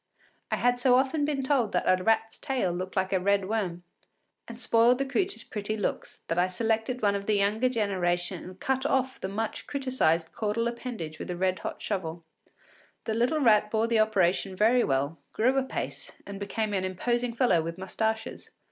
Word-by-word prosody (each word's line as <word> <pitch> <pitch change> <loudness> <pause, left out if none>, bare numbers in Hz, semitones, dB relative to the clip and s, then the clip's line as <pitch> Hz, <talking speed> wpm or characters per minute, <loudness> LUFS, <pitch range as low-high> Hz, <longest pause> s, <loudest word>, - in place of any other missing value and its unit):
I - - +1
had 245 0 +2
so 250 0 +4
often 275 +3 +2
been 285 -2 -1
told 260 -6 +1
that - - +1
a 185 0 +3
rat’s 225 +1 +1
tail 260 -10 -1
looked 185 +2 -5
like 190 0 0
a 190 - +3
red 200 +1 +1
worm 190 -5 -2 0.6
and 235 0 -9
spoiled 235 0 +4
the 275 - -1
creature’s 380 +8 -1
pretty 215 +1 -4
looks, 205 - -3
that 165 - 0
I 180 - +3
selected 225 +5 -1
one 200 -1 +4
of 200 0 -4
the 215 - +3
younger 210 +5 +2
generation 185 -6 -1
and 185 +1 -11
cut 265 0 0
off 265 -2 0
the - - -2
much 220 +3 -4
criticised 255 - 0
caudal 230 +1 -1
appendage 235 -10 -5
with - - -6
a 175 - -3
red 185 0 0
hot - - -6
shovel. 170 -5 -3 0.8
The 220 - -2
little 245 +7 +1
rat 210 -4 +4
bore 220 +1 +1
the 230 -1 +2
operation 195 -3 +2
very 230 +5 +4
well, 140 +3 0
grew 255 +4 +2
apace, 265 -1 -3
and 200 -1 -7
became 210 +1 -2
an 190 -2 0
imposing 240 +6 -1
fellow 235 -10 +3
with 165 +2 -5
mustaches. 220 +4 -3
215 Hz, 190 wpm, -28 LUFS, 185-245 Hz, 0.8 s, so